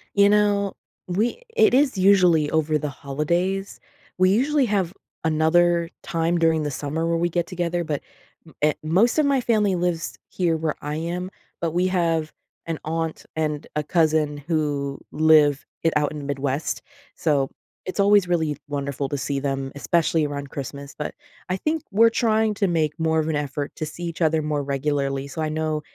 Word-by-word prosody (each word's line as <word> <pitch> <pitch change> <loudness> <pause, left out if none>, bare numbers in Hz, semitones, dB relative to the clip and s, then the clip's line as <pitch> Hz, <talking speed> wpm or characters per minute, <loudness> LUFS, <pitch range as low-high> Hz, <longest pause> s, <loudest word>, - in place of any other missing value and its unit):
You 200 0 +6
know, 205 -1 +2 0.3
we 215 - -1
it 445 -2 +5
is 265 -3 +3
usually 180 -6 +5
over 155 -1 +2
the 150 0 -3
holidays. 170 +8 -2 0.4
We 185 0 +4
usually 275 +5 +3
have 195 -5 0 0.3
another 170 +2 +3
time 170 0 0
during 160 -1 +2
the 150 - -2
summer 150 +4 -2
where 170 0 +1
we 175 +1 +1
get 175 0 -1
together, 175 -1 -2
but 150 -4 -3 0.4
m 160 - -16
eh 150 0 +4
most 195 - +3
of 305 - +4
my 275 -2 +2
family 210 -5 +2
lives 175 -2 -2
here 170 -3 0
where 155 -1 -1
I 150 +1 -3
am, 175 +3 -3 0.3
but 165 -1 0
we 180 +3 +1
have 165 -4 0 0.3
an 165 -2 -3
aunt 165 0 -3
and 150 -2 -2
a 150 - 0
cousin 155 -2 +2
who 145 -2 -2
live 150 -2 +4 0.2
i 165 - +4
out 150 -1 +2
in 150 - -6
the 145 - -7
Midwest, 140 +1 -2 0.3
so 140 -4 +1 0.4
it's 185 - -5
always 200 -1 +5
really 160 -5 0
wonderful 140 -1 -3
to 145 - -2
see 140 0 -2
them, 135 -1 -2
especially 160 +1 +1
around 140 -1 -5
Christmas, 140 +1 -7
but 150 - -4 0.3
I 185 - +1
think 310 +8 -1
we're 225 +3 +6
trying 220 -2 +2
to 200 -1 +1
make 160 -4 +1
more 160 0 +2
of 155 - 0
an 160 - 0
effort 145 0 -3
to 155 - -2
see 155 +3 -8
each 170 0 -5
other 160 -1 +3
more 150 -1 -1
regularly, 140 0 -1
so 150 +3 -5
I 155 - 0
know 155 0 -1
160 Hz, 185 wpm, -23 LUFS, 150-180 Hz, 0.4 s, You